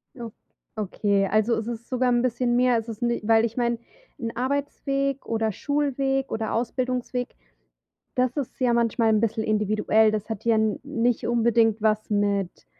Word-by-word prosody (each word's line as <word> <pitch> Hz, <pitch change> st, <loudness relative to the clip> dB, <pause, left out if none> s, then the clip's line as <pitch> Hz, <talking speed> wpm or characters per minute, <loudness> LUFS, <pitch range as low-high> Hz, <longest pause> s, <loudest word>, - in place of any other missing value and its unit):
O 235 Hz, -3 st, -7 dB, 0.4 s
okay, 200 Hz, -1 st, 0 dB
also, 215 Hz, +3 st, +2 dB
es 225 Hz, +1 st, -4 dB
ist 235 Hz, -1 st, -6 dB
sogar 255 Hz, -1 st, +1 dB
'n 240 Hz, 0 st, +3 dB
bisschen 245 Hz, -1 st, 0 dB
mehr. 250 Hz, -1 st, +3 dB
Es 225 Hz, +1 st, -4 dB
ist 220 Hz, +1 st, -7 dB
ni 240 Hz, 0 st, 0 dB
weil 225 Hz, +1 st, +4 dB
ich 230 Hz, +2 st, -5 dB
meine, 235 Hz, -1 st, +1 dB, 0.4 s
'n 230 Hz, -2 st, -3 dB
Arbeitsweg 275 Hz, +1 st, -2 dB
oder 225 Hz, -1 st, 0 dB
Schulweg 275 Hz, +1 st, -1 dB
oder 220 Hz, 0 st, -2 dB
Ausbildungsweg, 250 Hz, +1 st, -2 dB, 0.8 s
das 255 Hz, +2 st, +1 dB
ist 280 Hz, -4 st, -4 dB
ja 245 Hz, -2 st, +3 dB
manchmal 230 Hz, -1 st, +2 dB
'n 215 Hz, -1 st, +3 dB
bisschen 220 Hz, -1 st, 0 dB
individuell, 215 Hz, +1 st, +2 dB
das 215 Hz, +1 st, -3 dB
hat 220 Hz, 0 st, -5 dB
ja 230 Hz, -1 st, +3 dB
n 220 Hz, -1 st, +1 dB
nicht 245 Hz, -4 st, 0 dB
unbedingt 230 Hz, -2 st, +2 dB
was 215 Hz, 0 st, +1 dB
mit 200 Hz, -, -1 dB
230 Hz, 170 wpm, -25 LUFS, 220-250 Hz, 0.8 s, weil